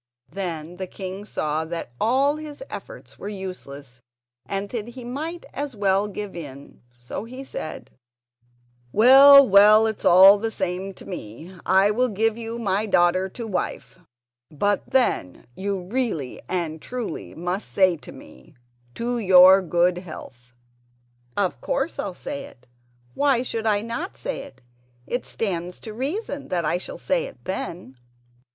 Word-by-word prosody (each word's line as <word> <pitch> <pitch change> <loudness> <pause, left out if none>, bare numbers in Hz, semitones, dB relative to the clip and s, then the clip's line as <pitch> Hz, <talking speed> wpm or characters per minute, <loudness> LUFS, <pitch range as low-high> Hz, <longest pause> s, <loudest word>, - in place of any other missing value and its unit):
Then 175 -3 -5
the 190 0 -4
king 190 +2 -7
saw 155 -5 -2
that 165 -6 -6
all 270 +6 +2
his 305 +6 -8
efforts - - -10
were 205 - -5
useless, 145 -10 -8 0.5
and 195 +1 -3
that 225 -1 -4
he 245 +1 -9
might 315 +7 -5
as 285 -3 -4
well 200 0 +2
give 205 -1 -6
in, 140 -4 -10 0.2
so 120 - -7
he 255 +3 -8
said: 155 -11 -7 1.0
"Well, 270 +5 +9
well, 210 +2 +7
it's 220 -1 -3
all 190 +3 +8
the 225 +2 -1
same 190 -1 -3
to - - -13
me—I 180 - -1
will 250 +4 +1
give 220 +1 +1
you 230 0 -6
my 210 -1 0
daughter 185 0 +3
to 235 +5 -7
wife; 185 -2 -4 0.5
but, 200 +7 -1
then, 240 - 0
you 195 0 -3
really 195 - -3
and 165 -4 -2
truly 245 -9 -6
must 180 +4 -4
say 185 -3 +4
to - - -12
me: 65 0 -15 0.4
'To 240 +1 -2
your 190 -1 +7
good 175 0 +1
health.'" 125 -8 -11 0.9
"Of 200 -3 0
course 275 +5 -2
I'll 190 -3 -3
say 280 +5 -6
it; 125 - -17 0.5
why 275 -4 +2
should 225 -3 -3
I 205 -1 +2
not 235 - -5
say - - -4
it? 285 - -16 0.4
It 245 - -3
stands 180 -4 -3
to 220 - -8
reason 285 - -4
that 175 -3 -1
I 175 +3 0
shall - - -8
say - - 0
it - - -13
then." 175 -7 -5
200 Hz, 150 wpm, -24 LUFS, 180-240 Hz, 1.0 s, Well